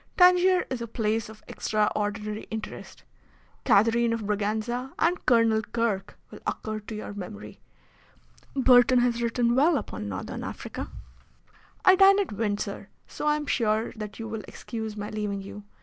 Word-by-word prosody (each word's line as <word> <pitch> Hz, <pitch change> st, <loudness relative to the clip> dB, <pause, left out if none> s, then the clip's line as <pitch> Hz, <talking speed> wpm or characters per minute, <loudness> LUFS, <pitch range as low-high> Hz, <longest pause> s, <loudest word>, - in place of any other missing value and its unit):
Tangier 360 Hz, 0 st, +5 dB
is 255 Hz, -2 st, -3 dB
a 235 Hz, -, -4 dB
place 220 Hz, -1 st, -1 dB
of 220 Hz, 0 st, -13 dB
extraordinary 210 Hz, 0 st, -1 dB
interest. 220 Hz, -1 st, -7 dB, 0.6 s
Catherine 230 Hz, +3 st, +4 dB
of 230 Hz, -, -2 dB
Braganza 215 Hz, +5 st, -2 dB
and 345 Hz, +2 st, +1 dB
Colonel 230 Hz, -2 st, +4 dB
Kirke 220 Hz, -3 st, -2 dB, 0.2 s
will -, -, -10 dB
occur 215 Hz, 0 st, -3 dB
to 215 Hz, +1 st, -8 dB
your 210 Hz, -1 st, -6 dB
memory. 205 Hz, +1 st, -8 dB, 1.0 s
Burton 255 Hz, -1 st, +6 dB
has 240 Hz, -1 st, +1 dB
written 235 Hz, 0 st, +1 dB
well 295 Hz, +5 st, +4 dB
upon 105 Hz, -, -5 dB
Northern 100 Hz, 0 st, -5 dB
Africa. -, -, -6 dB, 1.0 s
I 375 Hz, -, +8 dB
dine 390 Hz, +1 st, +7 dB
at 400 Hz, -, -1 dB
Windsor, 205 Hz, -2 st, -3 dB, 0.2 s
so 300 Hz, -, -5 dB
I 300 Hz, -, +4 dB
am 300 Hz, 0 st, -3 dB
sure 220 Hz, -4 st, +1 dB
that 215 Hz, -1 st, -7 dB
you 225 Hz, -, -6 dB
will 220 Hz, -1 st, -4 dB
excuse 220 Hz, -2 st, -6 dB
my 205 Hz, 0 st, -5 dB
leaving 205 Hz, -2 st, -3 dB
you. 205 Hz, +1 st, -10 dB
225 Hz, 150 wpm, -27 LUFS, 210-245 Hz, 1.0 s, I